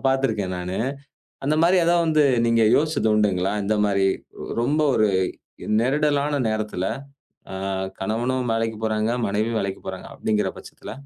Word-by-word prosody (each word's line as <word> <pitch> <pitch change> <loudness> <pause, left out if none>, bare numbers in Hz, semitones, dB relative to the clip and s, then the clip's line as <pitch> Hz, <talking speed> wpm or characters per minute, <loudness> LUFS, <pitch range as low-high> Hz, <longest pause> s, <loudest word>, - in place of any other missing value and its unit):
பார்த்திருக்கேன் 110 -9 0
நானு. 90 +1 -4 0.7
அந்த 150 +3 +2
மாரி 180 +3 +5
ஏதாவது 170 0 +3
வந்து 155 -1 +3 0.2
நீங்க 115 -1 +3
யோசித்தது 155 -6 +1
உண்டுங்களா? 100 -3 +1
இந்த 110 +2 +1
மாரி 100 -1 +2 0.5
ரொம்ப 145 +6 +1
ஒரு 110 -1 +3 0.7
நெருக்கடியான 145 +2 +1
நேரத்தில், 105 -4 -2 1.1
கணவனும் 120 +4 -1
வேலைக்கு 115 -1 -1
போறாங்க, 110 +1 0 0.2
மனைவியும் 110 +3 0
வேலைக்கு 95 -1 -4
போறாங்க - - -6
அப்படிங்கிற 105 -3 0
பட்சத்தில? - - -10
110 Hz, 125 wpm, -23 LUFS, 105-140 Hz, 1.1 s, மாரி